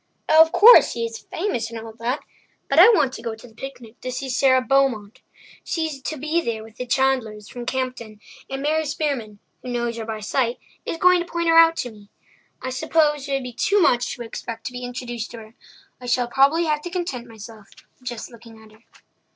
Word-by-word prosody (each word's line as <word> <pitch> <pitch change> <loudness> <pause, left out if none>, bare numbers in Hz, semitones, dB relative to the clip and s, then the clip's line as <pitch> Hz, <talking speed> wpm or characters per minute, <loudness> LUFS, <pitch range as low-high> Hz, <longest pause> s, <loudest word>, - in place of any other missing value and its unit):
Oh, 315 +1 +7
of 320 0 +5
course, 460 +6 +8
he 235 -1 -2
is 230 0 -6
famous 325 - -3
and 230 -1 -7
all 225 0 -9
that! 245 +5 -2 0.5
But 275 - +3
I 380 +6 +10
want 280 - +3
to - - -7
go 230 -2 -4
to 225 +3 -14
the 225 - -19
picnic 240 -1 -10
to 255 - -4
see 265 +1 -5
Sara 260 0 +4
Beaumont. 255 -4 0 0.4
She's 315 -5 -3
to 310 +4 -4
be 310 +4 0
there 225 -6 -3
with 225 0 -15
the 250 - -5
Chandlers 245 -5 0
from 245 -1 -8
Campden, 255 -5 -4 0.3
and 270 0 -4
Mary 315 +2 +1
Spearman, 275 -9 -3 0.2
who 250 - -8
knows 240 -1 -2
her 225 - -5
by 220 -1 -5
sight, 235 +3 -1 0.3
is - - -3
going 360 +1 +5
to 345 - -6
point 340 0 0
her 330 - +4
out 330 0 +7
to 245 - -3
me. 205 -2 -17 0.5
I 260 - -3
suppose 295 0 +1
it - - -1
would 270 -1 -1
be 250 -1 -7
too 400 - +2
much 245 -6 +2
to 240 - -7
expect 225 0 -7
to - - -4
be 250 0 -6
introduced 240 -2 -5
to 235 - -9
her. 220 +1 -13 0.4
I 250 - -9
shall 245 0 +1
probably 280 +7 +3
have 300 -1 0
to 350 - -6
content 340 -10 -4
myself 220 -1 -12 0.3
with 250 - -14
just 240 0 -7
looking 230 -1 -14
at 220 -1 -17
her." 215 +1 -22
250 Hz, 225 wpm, -22 LUFS, 230-295 Hz, 0.5 s, I